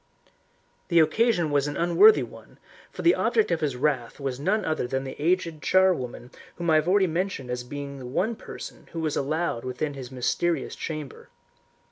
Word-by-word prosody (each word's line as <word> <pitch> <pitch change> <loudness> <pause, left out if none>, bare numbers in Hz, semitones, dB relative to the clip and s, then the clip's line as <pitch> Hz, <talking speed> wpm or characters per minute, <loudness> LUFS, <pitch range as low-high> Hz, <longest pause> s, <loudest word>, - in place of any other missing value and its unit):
The 170 -2 +4
occasion 175 -1 +3
was 145 0 +2
an 145 - -4
unworthy 285 - +6
one, - - -13 0.3
for - - -8
the 345 - +6
object 440 -1 +1
of - - 0
his 145 -4 -1
wrath 130 -3 -1
was 135 -2 -3
none 195 +8 0
other 155 -6 -1
than 135 +1 -2
the 135 - -6
aged 165 -1 0
charwoman 135 -10 +1 0.2
whom 170 -1 -1
I - - +5
have 155 +2 +1
already 190 +1 +4
mentioned 170 -7 -2
as 125 0 -3
being 140 +2 -7
the 125 - -8
one 200 - -1
person - - -10
who 165 - -4
was 155 -2 -1
allowed 150 -3 -1
within 130 +4 -3
his 130 -2 -8
mysterious 160 +7 -1
chamber. 155 -4 -6
155 Hz, 180 wpm, -26 LUFS, 135-175 Hz, 0.3 s, unworthy